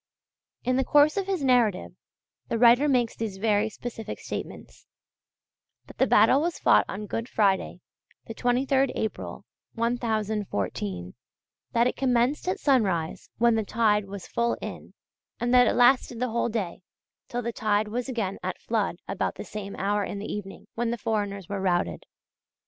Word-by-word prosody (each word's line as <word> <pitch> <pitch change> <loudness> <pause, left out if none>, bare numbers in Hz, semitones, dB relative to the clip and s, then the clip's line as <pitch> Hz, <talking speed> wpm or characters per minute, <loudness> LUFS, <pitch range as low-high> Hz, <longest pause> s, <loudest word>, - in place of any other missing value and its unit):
In 255 +1 +1
the 265 - +2
course 290 +3 +4
of 390 -1 -1
his 375 -6 -1
narrative 240 -7 +2 0.6
the 230 - -1
writer 245 +5 +6
makes 245 -4 +1
these 215 -4 -4
very 210 +1 +1
specific 225 0 -7
statements: - - -8 1.0
that - - -15
the - - +4
battle 275 - +5
was 340 +1 -1
fought - - +4
on 210 +2 -5
Good 230 +3 -4
Friday, 195 -3 +1 0.4
the 225 - -7
23rd 260 +3 +1
April, 220 - -4 0.3
1014; 210 - -2 0.6
that 235 0 +4
it 250 - 0
commenced 255 +4 +1
at 370 - 0
sunrise 195 - +1
when 235 0 +4
the 220 -1 +1
tide 210 -1 +2
was 195 -2 -8
full 235 0 0
in, - - -8 0.4
and 240 +1 0
that 250 0 +7
it - - +2
lasted 245 -1 +4
the 255 0 0
whole 235 +1 0
day 205 -6 -3 0.5
till 245 0 -3
the 235 +1 -3
tide 215 -1 +1
was 245 +4 -3
again 220 -6 -2
at 185 +1 -3
flood 215 -6 -1
about 195 - -2
the - - -7
same 200 -2 -7
hour 205 +2 0
in 200 - -5
the 200 - -5
evening, 195 -2 -7
when 235 0 -1
the 235 - -2
foreigners 205 -4 -2
were 200 -1 -3
routed. 180 -2 -1
225 Hz, 165 wpm, -26 LUFS, 205-245 Hz, 1.0 s, that